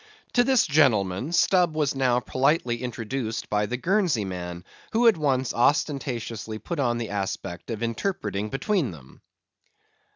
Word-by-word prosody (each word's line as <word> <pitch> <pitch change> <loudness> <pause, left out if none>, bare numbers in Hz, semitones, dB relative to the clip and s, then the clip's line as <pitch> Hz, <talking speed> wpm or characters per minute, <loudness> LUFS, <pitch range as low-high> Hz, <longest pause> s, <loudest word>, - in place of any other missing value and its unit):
To 245 - +5
this 260 -1 +3
gentleman, 125 - +2
Stubb 175 -1 +3
was 150 -3 +1
now 130 -2 +2
politely 130 -2 0
introduced 120 -1 -4
by 105 0 +1
the 125 - -2
Guernsey 175 - +1
man, 90 -2 -6 0.3
who 235 +2 +4
at 225 - +6
once 135 -5 0
ostentatiously 120 -5 0
put 170 +8 -5
on 120 -3 +1
the 115 -2 -4
aspect 95 -2 -4
of 115 -1 -3
interpreting 110 - -2
between 150 - 0
them. 70 -7 -13
125 Hz, 140 wpm, -25 LUFS, 105-155 Hz, 0.3 s, at